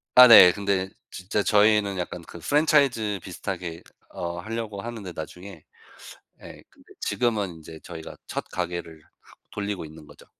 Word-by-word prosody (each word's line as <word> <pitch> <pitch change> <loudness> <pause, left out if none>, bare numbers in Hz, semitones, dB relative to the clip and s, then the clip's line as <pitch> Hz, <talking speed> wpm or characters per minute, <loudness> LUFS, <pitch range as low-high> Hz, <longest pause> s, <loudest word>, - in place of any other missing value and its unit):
아 125 0 +11
네. 110 -6 +10
근데 100 -1 -1 0.2
진짜 100 +3 -2
저희는 105 -1 +3
약간 90 -1 -5
그 85 - -12
프랜차이즈 135 - +2
비슷하게 85 -2 -6 0.3
어 85 0 -5
하려고 110 0 -5
하는데, 110 -4 -7
나중에. 90 +1 -9 0.8
예 - - -12
근데 - - -21
지금은 105 -8 -1
이제 80 0 -12
저희가 80 -2 -9
첫 - - -4
가게를 85 -3 -5 0.2
하 - - -20 0.2
돌리고 100 -3 -4
있는 80 0 -12
거죠. - - -17
100 Hz, 310 characters per minute, -25 LUFS, 85-110 Hz, 0.8 s, 아